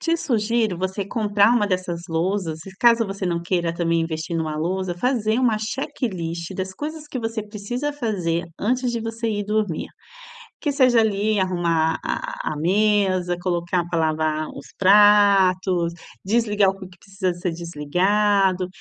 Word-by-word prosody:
te 330 Hz, 0 st, +1 dB
sugiro 230 Hz, -, 0 dB
você 190 Hz, +2 st, -2 dB
comprar 205 Hz, 0 st, +2 dB
uma 215 Hz, -4 st, +2 dB
dessas 180 Hz, -3 st, -2 dB
lousas 165 Hz, -1 st, -1 dB
e 195 Hz, -, -9 dB
caso 235 Hz, -1 st, +5 dB
você 195 Hz, -1 st, -4 dB
não 170 Hz, -1 st, -1 dB
queira 170 Hz, -1 st, -1 dB
também 170 Hz, -1 st, +1 dB
investir 165 Hz, +1 st, -3 dB
numa 155 Hz, -2 st, -2 dB
lousa, 180 Hz, +3 st, -2 dB
fazer 235 Hz, 0 st, 0 dB
uma 230 Hz, -4 st, +2 dB
checklist 190 Hz, -, -4 dB
das 190 Hz, 0 st, -4 dB
coisas 300 Hz, +6 st, -7 dB
que 255 Hz, -, -4 dB
você 225 Hz, -1 st, -3 dB
precisa 235 Hz, +7 st, -4 dB
fazer 185 Hz, -, -2 dB, 0.2 s
antes 250 Hz, +2 st, 0 dB
de 235 Hz, -, -2 dB
você 225 Hz, +1 st, -3 dB
ir 205 Hz, -1 st, -2 dB
dormir. 210 Hz, -5 st, -1 dB, 0.7 s
Que 295 Hz, -, 0 dB
seja 255 Hz, -4 st, +4 dB
ali, 215 Hz, -1 st, +1 dB
arrumar 170 Hz, -3 st, +1 dB
a -, -, -3 dB, 0.2 s
a -, -, -5 dB
mesa, 185 Hz, 0 st, +2 dB
colocar 175 Hz, -1 st, -1 dB
para 170 Hz, -, 0 dB
lavar 155 Hz, -1 st, 0 dB
os -, -, -10 dB
pratos, 195 Hz, -3 st, +5 dB, 0.3 s
desligar 210 Hz, -2 st, +2 dB
o 195 Hz, -, -9 dB
que 190 Hz, -, -9 dB
que 180 Hz, -, -18 dB
precisa 190 Hz, -1 st, -3 dB
ser 175 Hz, +1 st, -3 dB
desligado, 185 Hz, +4 st, +1 dB
195 Hz, 155 wpm, -22 LUFS, 175-220 Hz, 0.7 s, caso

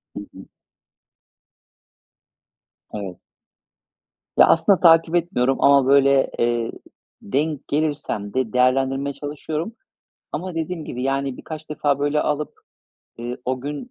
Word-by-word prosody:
Hı -, -, -4 dB
hı. -, -, -12 dB, 2.5 s
Evet. 95 Hz, -4 st, -6 dB, 1.2 s
Ya, -, -, +8 dB
aslında 185 Hz, +3 st, +4 dB
takip 165 Hz, 0 st, +5 dB
etmiyorum. 135 Hz, -7 st, +1 dB
Ama 140 Hz, -2 st, +5 dB
böyle, 140 Hz, -1 st, +4 dB
eee, 120 Hz, -1 st, 0 dB, 0.5 s
denk 145 Hz, +6 st, -2 dB
gelirsem 145 Hz, -9 st, -2 dB
de 130 Hz, -4 st, -1 dB
değerlendirmeye 135 Hz, +2 st, +1 dB
çalışıyorum. 150 Hz, +7 st, -5 dB, 0.6 s
Ama 175 Hz, +3 st, -4 dB
dediğim 165 Hz, 0 st, -4 dB
gibi, 125 Hz, +1 st, -5 dB
yani, 135 Hz, -1 st, -1 dB
birkaç 155 Hz, -1 st, -9 dB
defa 145 Hz, -2 st, 0 dB
böyle 145 Hz, +1 st, +1 dB
alıp, 150 Hz, 0 st, -2 dB, 0.7 s
eee, 120 Hz, +1 st, -5 dB
o 130 Hz, 0 st, -2 dB
gün 145 Hz, -, -6 dB
140 Hz, 110 wpm, -22 LUFS, 130-155 Hz, 2.5 s, Ya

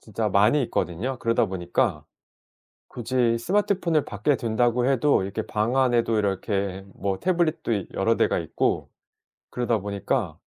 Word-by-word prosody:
진짜 110 Hz, 0 st, -2 dB
많이 105 Hz, +9 st, +3 dB
있거든요. 110 Hz, +7 st, -2 dB
그러다 115 Hz, 0 st, +1 dB
보니까 90 Hz, -, -1 dB, 0.8 s
굳이 120 Hz, -1 st, 0 dB
스마트폰을 180 Hz, -, +1 dB
밖에 105 Hz, +8 st, 0 dB
둔다고 120 Hz, +1 st, +1 dB
해도 135 Hz, -2 st, +3 dB
이렇게 100 Hz, +3 st, -3 dB
방 110 Hz, +4 st, -1 dB
안에도 120 Hz, -3 st, +2 dB
이렇게 100 Hz, -1 st, -2 dB
뭐 95 Hz, -1 st, -2 dB
태블릿도 170 Hz, -8 st, 0 dB
이 100 Hz, -4 st, -2 dB
여러 -, -, +1 dB
대가 -, -, +2 dB
있고 -, -, -1 dB, 0.6 s
그러다 120 Hz, -2 st, 0 dB
보니까 100 Hz, 0 st, -2 dB
115 Hz, 320 characters per minute, -25 LUFS, 100-130 Hz, 0.8 s, 많이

